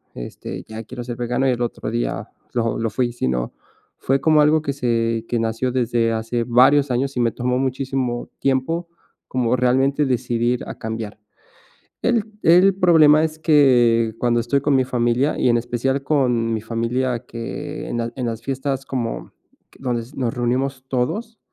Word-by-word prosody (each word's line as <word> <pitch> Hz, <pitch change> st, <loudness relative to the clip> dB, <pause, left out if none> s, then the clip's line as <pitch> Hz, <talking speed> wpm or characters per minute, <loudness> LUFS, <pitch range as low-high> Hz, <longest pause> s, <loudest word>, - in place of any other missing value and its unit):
este, -, -, -7 dB
ya 110 Hz, 0 st, -7 dB
quiero 120 Hz, +2 st, -7 dB
ser 120 Hz, 0 st, -5 dB
vegano", 125 Hz, +2 st, 0 dB
y -, -, +3 dB
el 120 Hz, -1 st, -2 dB
otro 120 Hz, -2 st, -3 dB
día 120 Hz, +1 st, -2 dB, 0.2 s
lo 115 Hz, -2 st, 0 dB
lo 115 Hz, 0 st, 0 dB
fui, 120 Hz, +3 st, -1 dB
sino 65 Hz, -, -2 dB, 0.4 s
fue 135 Hz, +1 st, +1 dB
como 155 Hz, 0 st, +4 dB
algo 155 Hz, +1 st, +4 dB
que 140 Hz, -, -2 dB
se 115 Hz, -3 st, 0 dB
que 120 Hz, -, -1 dB
nació 115 Hz, +3 st, -1 dB
desde 120 Hz, -2 st, +1 dB
hace 115 Hz, +1 st, -2 dB
varios 135 Hz, +4 st, +5 dB
años 135 Hz, +3 st, -1 dB
y -, -, +1 dB
me 120 Hz, -1 st, +2 dB
tomó 125 Hz, +2 st, -1 dB
muchísimo 130 Hz, -2 st, -2 dB
tiempo 140 Hz, +6 st, 0 dB, 0.4 s
como 125 Hz, -1 st, 0 dB
realmente 130 Hz, +3 st, +2 dB
decidir 120 Hz, -1 st, 0 dB
a -, -, -6 dB
cambiar. 110 Hz, -1 st, -5 dB, 0.8 s
El 235 Hz, -1 st, +3 dB, 0.2 s
el 180 Hz, +4 st, +6 dB
problema 160 Hz, -5 st, +5 dB
es 155 Hz, -1 st, -3 dB
que 120 Hz, -8 st, +4 dB
cuando 120 Hz, -1 st, +2 dB
estoy 120 Hz, +4 st, 0 dB
con 145 Hz, 0 st, +2 dB
mi 130 Hz, -1 st, +3 dB
familia, 125 Hz, +3 st, +1 dB
y 125 Hz, -, +3 dB
en 120 Hz, -, +4 dB
especial 120 Hz, +3 st, -1 dB
con 125 Hz, -6 st, +1 dB
mi 110 Hz, -, -2 dB
familia 120 Hz, +2 st, -2 dB
que 115 Hz, -1 st, -6 dB
en -, -, -2 dB
las 115 Hz, 0 st, -2 dB
en 130 Hz, -, -3 dB
las 115 Hz, -1 st, -4 dB
fiestas 135 Hz, 0 st, -3 dB
como 120 Hz, -4 st, -4 dB, 0.5 s
donde 120 Hz, -3 st, -2 dB
nos 125 Hz, -3 st, -1 dB
reunimos 130 Hz, +2 st, -1 dB
todos, 205 Hz, -, -2 dB
125 Hz, 170 wpm, -21 LUFS, 115-135 Hz, 0.8 s, el